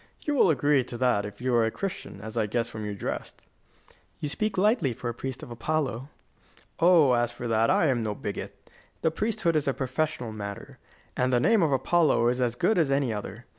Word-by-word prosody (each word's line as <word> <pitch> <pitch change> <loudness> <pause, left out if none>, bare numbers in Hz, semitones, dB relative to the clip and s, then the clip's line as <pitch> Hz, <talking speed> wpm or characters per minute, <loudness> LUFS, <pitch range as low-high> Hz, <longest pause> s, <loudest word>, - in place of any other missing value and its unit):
You 295 - -1
will 255 -9 +4
agree 145 -2 +3
to 120 -1 -7
that 120 -5 +2
if 105 +3 -12
you 130 0 0
are 120 -1 +4
a 110 - +2
Christian, 180 - -6
as 110 +1 -8
I 110 -2 +1
guess 115 +2 -1
from 110 - -7
your 105 -1 -4
dress." - - -5 0.8
"You 150 - -3
speak 215 +6 -2
lightly 205 - +2
for 120 - -4
a - - -3
priest 130 +2 -6
of - - -9
Apollo." 135 0 -2 0.7
"Oh, 165 -6 +6
as 120 0 +1
for 120 0 -6
that, 115 0 +2
I - - +3
am 130 -5 +2
no 105 -2 -2
bigot. - - -7 0.4
The 160 - +3
priesthood 175 -2 0
is 150 -2 +1
a 135 - +1
professional 130 -2 -2
matter, 100 -2 -7 0.4
and 125 0 +1
the 125 - +3
name 225 - +4
of 160 -4 +2
Apollo 135 -2 +3
is 125 +1 -1
as 120 -1 0
good 205 - +2
as 155 -4 +2
any 135 -4 +1
other. 105 +3 -7
125 Hz, 215 wpm, -27 LUFS, 115-155 Hz, 0.8 s, Oh